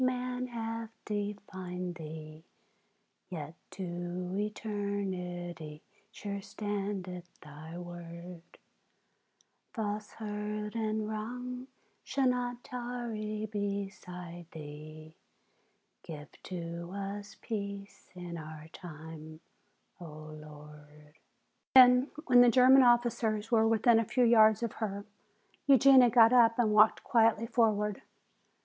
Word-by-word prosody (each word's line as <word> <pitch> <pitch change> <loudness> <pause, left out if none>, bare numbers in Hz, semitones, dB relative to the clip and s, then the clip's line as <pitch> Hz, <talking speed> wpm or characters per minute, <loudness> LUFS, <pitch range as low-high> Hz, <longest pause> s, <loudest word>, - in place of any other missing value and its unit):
Man 250 0 -1
hath 230 -1 -4 0.2
defied 190 -4 -4
Thee, 155 -1 -9 0.9
Yet 155 -4 -6 0.2
to 175 -1 -4
eternity 190 -6 -4 0.3
sure 200 -2 -5
standeth 195 -3 -4
Thy 155 +2 -10
word; 175 0 -9 1.3
Falsehood 210 -1 -4
and 215 -1 -1
wrong 250 +4 -5 0.4
shall 270 -1 +1
not 245 -1 -1
tarry 235 -4 -4
beside 195 -4 -5
Thee, 155 +1 -10 0.9
Give 150 -3 -9 0.2
to 170 -1 -6
us 200 +1 -5
peace 200 -2 -6
in 175 -1 -6
our 155 0 -9
time, 160 -2 -10 0.6
O 175 - -8 0.3
Lord!" 150 0 -14 0.6
Then 250 +1 +8 0.2
when 245 -1 +7
the 245 - +7
German 260 +2 +7
officers 235 -3 +2
were 225 -1 +4
within 225 +1 +4
a 225 - 0
few 250 +4 +1
yards 220 -2 +6
of 235 - -1
her, 200 -1 -3 0.6
Eugenia 265 -2 +7
got 230 0 +6
up 230 -2 +6
and 220 -3 +2
walked 215 +1 +5
quietly 225 -1 +3
forward. 210 -3 +1
205 Hz, 100 wpm, -31 LUFS, 175-230 Hz, 1.3 s, Then